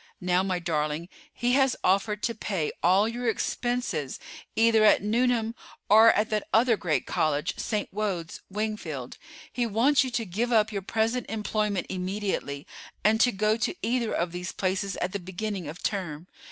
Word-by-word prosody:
Now, 180 0 +2
my 190 -1 -1
darling, 160 -1 -2 0.2
he 240 +1 -1
has 270 -2 +3
offered 205 +3 +1
to 230 - 0
pay 195 -7 -2
all 190 +5 +4
your 240 +1 -1
expenses 240 - -2 0.4
either 225 -1 +4
at 210 - +5
Newnham 230 +1 +1 0.4
or 220 +2 +8
at 215 +2 0
that 215 -1 -1
other 230 +1 +4
great 175 -6 -1
college, 150 -1 0
St. 210 -2 -1
Wode's, 195 -5 -3
Wingfield. 190 - -4 0.3
He 240 -1 0
wants 250 +7 +3
you 260 - -3
to 240 -2 -2
give 220 +6 -2
up 220 -2 +3
your 200 -2 -3
present 225 +5 -1
employment 210 -3 -1
immediately, 185 -6 -3 0.4
and 220 +3 +4
to 245 - +5
go 215 +2 +1
to 235 - -1
either 235 0 0
of 170 0 -1
these 180 +1 -5
places 190 0 -1
at 180 - -2
the 200 - -3
beginning 190 0 -4
of 160 +6 -8
term. 175 -6 -3
210 Hz, 165 wpm, -27 LUFS, 180-225 Hz, 0.4 s, or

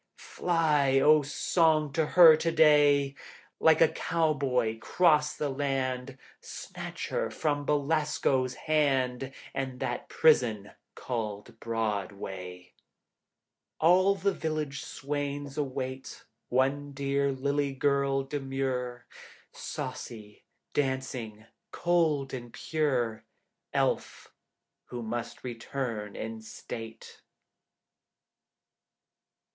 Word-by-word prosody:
Fly, 150 -6 +1
O 150 +2 +6
song, 155 +1 +1
to 160 -1 +1
her 165 -3 +10
to 165 +2 -1
day, 145 -3 +5 0.5
Like 160 0 +5
a 165 - +8
cowboy 140 -9 0
cross 150 +2 +3
the 150 - -1
land. 135 -1 -2 0.2
Snatch - - -7
her - - -1
from 145 -2 -1
Belasco's 145 -3 +1
hand 135 -4 0 0.2
And 130 -2 -4
that 120 - -3
prison 115 -10 +3 0.2
called 115 -1 -5
Broadway. 100 -5 -4 1.1
All 185 +4 +5
the 200 0 0
village 155 -4 -3
swains 145 0 -4
await 130 -2 -5 0.2
One 140 +3 0
dear 140 0 0
lily 140 +1 -1
girl 140 0 +1
demure, 135 -3 -3 0.5
Saucy, 105 -3 -7 0.3
dancing, 130 -6 -2 0.2
cold 160 -6 +1
and 120 -2 -6
pure, 130 -9 -1 0.5
Elf - - -1 0.5
who 120 -1 -6
must 115 +1 -5
return 115 -3 -4
in 110 0 -6
state. 115 0 -9
135 Hz, 90 wpm, -29 LUFS, 120-150 Hz, 1.1 s, her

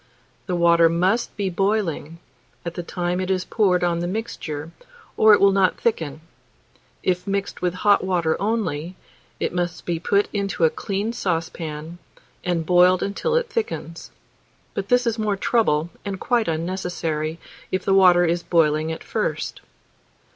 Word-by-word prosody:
The 180 - -1
water 170 -1 +5
must 185 +9 0
be 195 -2 -1
boiling 180 -5 -1 0.5
at 170 - -3
the 175 - -4
time 175 +1 -2
it 185 - -3
is 185 -1 0
poured 185 -5 +2
on 170 -1 +1
the 175 - -2
mixture, 165 -7 -5 0.4
or 215 -1 +7
it - - -1
will 200 0 +6
not 190 -1 +2
thicken; 160 -10 -1 0.8
if 180 0 0
mixed 200 0 -2
with 180 -1 0
hot 205 -1 +5
water 175 -4 +1
only, 185 -6 -2 0.4
it - - -1
must 175 -1 -3
be 170 -2 -1
put 200 +4 +2
into 200 -4 -1
a 160 - +5
clean 205 +3 -3
saucepan, 165 -4 -4 0.4
and 170 -2 -1
boiled 180 +1 +5
until 465 - -1
it 485 0 +1
thickens; 440 - -4 0.6
but 200 0 -4
this 245 0 +3
is 230 -1 0
more 210 -2 0
trouble, 170 -8 +1
and 195 -2 -4
quite 240 -2 +1
unnecessary 165 -2 -2 0.3
if 185 0 -1
the 195 - +3
water 180 -2 +6
is 170 +1 0
boiling 155 -2 +2
at 160 - -6
first. - - -3
180 Hz, 155 wpm, -23 LUFS, 165-200 Hz, 0.8 s, or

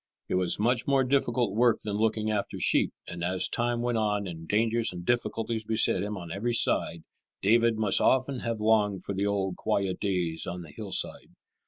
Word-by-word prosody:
It - - -2
was 90 -1 +1
much 120 +2 +1
more 135 -1 +3
difficult 125 -5 +1
work 115 +1 +3
than 105 -1 -3
looking 110 0 0
after 105 -2 -2
sheep, - - +3 0.2
and 85 0 -6
as 90 +1 0
time 120 0 -1
went 120 -2 0
on 105 -2 0
and 80 -2 -7
dangers 115 +3 +1
and 90 -1 -8
difficulties 115 -1 -1
beset 110 0 +2
him 105 0 -3
on 85 -3 -8
every 115 +7 -1
side, 85 -6 +1 0.4
David 115 +2 +4
must 105 -3 +2
often 130 0 +2
have 115 -2 -3
longed 105 -3 +2
for - - -4
the 100 +1 -1
old 95 -2 -1
quiet 95 -2 -1
days 90 -5 -2
on 90 0 -5
the 80 - -12
hillside. - - -4
105 Hz, 190 wpm, -28 LUFS, 95-115 Hz, 0.4 s, David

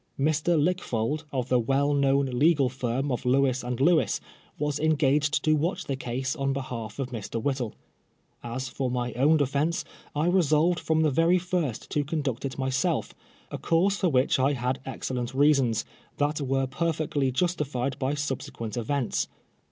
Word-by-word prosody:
Mr. 155 +3 +2
Lickfold, 150 -4 -1
of 130 -2 -2
the 125 - +4
well 135 +5 +1
known 140 0 +3
legal 135 +2 +3
firm 130 +2 -2
of 125 - -2
Lewis 130 0 +2
and 125 -1 -3
Lewis, 160 +3 +3 0.4
was 150 0 -1
engaged 150 -1 +2
to 155 0 +4
watch 160 +5 -1
the 135 - -2
case 130 +2 -3
on 135 -2 0
behalf 120 -5 -5
of 135 -2 -3
Mr. 115 -1 -4
Whittle. 130 -2 -2 0.7
As 130 +3 -4
for 130 0 -2
my 125 -1 -2
own 145 +6 +4
defence, 145 +4 0 0.3
I 150 +2 +1
resolved 170 -1 +3
from 160 0 +1
the 155 -2 +3
very 165 +6 +4
first 175 -9 -2
to 145 - +1
conduct 140 -5 -2
it 135 - -4
myself, 130 -1 0 0.4
a - - -4
course 190 +5 +2
for 185 - +1
which 130 -2 +2
I 135 +3 +3
had 125 0 -1
excellent 130 -1 -4
reasons, 135 -6 +3 0.3
that 145 +1 0
were 135 0 0
perfectly 145 -1 -1
justified 140 -4 -1
by 135 +2 0
subsequent 130 -6 -4
events. 125 +2 -1
140 Hz, 160 wpm, -27 LUFS, 130-155 Hz, 0.7 s, the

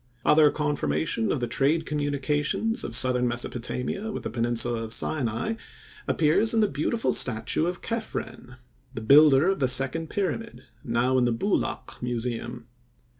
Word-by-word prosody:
Other 150 -1 +6
confirmation 110 - -1
of 135 - -2
the 120 - -1
trade 155 +6 +1
communications 150 +8 -1
of - - -3
southern 125 -1 +3
Mesopotamia 125 - -3
with - - -6
the - - -4
peninsula 120 0 0
of 110 0 -4
Sinai 120 - -2 0.5
appears 165 +9 +2
in - - +3
the 215 - +3
beautiful 195 - -1
statue 125 +7 +1
of 175 0 -5
Kephren, 225 - -5 0.4
the 115 - -5
builder 140 +5 +6
of 195 - -1
the 130 - +2
second 135 +5 +3
pyramid, 215 +3 -4 0.2
now 125 +2 +1
in 125 - +2
the 120 - +1
Boulak 195 - -2
museum. 120 0 -4
135 Hz, 145 wpm, -26 LUFS, 120-160 Hz, 0.5 s, Other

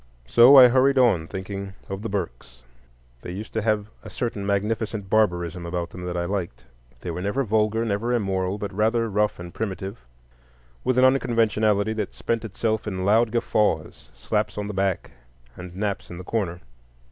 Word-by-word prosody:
So 125 +4 +8
I 130 -1 +11
hurried 135 +2 +3
on, 105 -11 +3
thinking 95 +1 -6
of 95 0 -5
the 115 - -4
Burkes. 65 -10 -5 0.6
They - - -7
used 105 +4 -7
to 110 - 0
have 105 -1 +1 0.2
a - - -10
certain 105 -5 -3
magnificent 105 0 -2
barbarism 90 -5 +1
about 85 0 -4
them 90 0 -8
that 90 0 -3
I 85 - -1
liked. 95 -2 -4 0.4
They 90 - -4
were 90 - -5
never 105 +8 0
vulgar, 110 0 +1
never 110 +3 -1
immoral, 95 -4 0
but 100 -1 -5
rather 115 +3 +1
rough 105 +1 +1
and 90 0 -8
primitive, 100 0 -4 0.8
with 130 -1 +1
an 130 - +6
unconventionality 110 -5 +2
that 105 -3 -4
spent 115 -1 -2
itself 110 0 -2
in 95 -2 -3
loud 110 +3 +4
guffaws, 105 -8 0
slaps - - -2
on 105 0 -3
the 105 - -5
back, 95 -2 -1 0.4
and 90 -1 -10
naps 100 0 -3
in 85 - -8
the 90 - -8
corner. 90 -4 -2
105 Hz, 175 wpm, -24 LUFS, 95-110 Hz, 0.8 s, I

